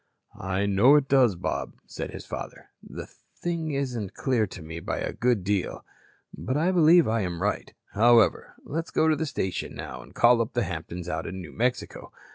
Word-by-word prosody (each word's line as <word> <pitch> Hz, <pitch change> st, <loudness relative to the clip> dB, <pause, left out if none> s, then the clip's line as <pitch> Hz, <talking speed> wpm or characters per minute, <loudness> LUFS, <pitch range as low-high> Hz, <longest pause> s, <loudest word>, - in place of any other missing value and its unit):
"I 95 Hz, 0 st, -1 dB
know 100 Hz, +8 st, +5 dB
it 145 Hz, -2 st, +3 dB
does, 130 Hz, -7 st, +4 dB
Bob," 85 Hz, -, -3 dB
said -, -, -6 dB
his -, -, -9 dB
father. -, -, -8 dB
"The -, -, -8 dB
thing 170 Hz, -2 st, -5 dB
isn't 125 Hz, -8 st, -3 dB
clear 120 Hz, -6 st, +1 dB
to 90 Hz, -, -10 dB
me 80 Hz, +1 st, -7 dB
by -, -, -3 dB
a -, -, -3 dB
good 120 Hz, -5 st, +1 dB
deal. 100 Hz, -1 st, -2 dB, 0.5 s
But 130 Hz, -, -2 dB
I 170 Hz, +5 st, +2 dB
believe 170 Hz, -1 st, +6 dB
I 110 Hz, 0 st, +1 dB
am 90 Hz, -3 st, -3 dB
right. -, -, -2 dB, 0.2 s
However, 115 Hz, +2 st, +4 dB
let's 165 Hz, +3 st, -4 dB
go -, -, +1 dB
into 160 Hz, -1 st, +4 dB
the 155 Hz, +2 st, -2 dB
station 95 Hz, -8 st, -3 dB
now -, -, -7 dB
and -, -, -16 dB
call 120 Hz, 0 st, +5 dB
up 115 Hz, -, -3 dB
the 120 Hz, -, +1 dB
Hamptons 85 Hz, -1 st, -6 dB
out 80 Hz, -2 st, -3 dB
in 95 Hz, +2 st, -6 dB
New 90 Hz, -4 st, -9 dB
Mexico. 125 Hz, +2 st, -2 dB
115 Hz, 195 wpm, -26 LUFS, 95-140 Hz, 0.5 s, believe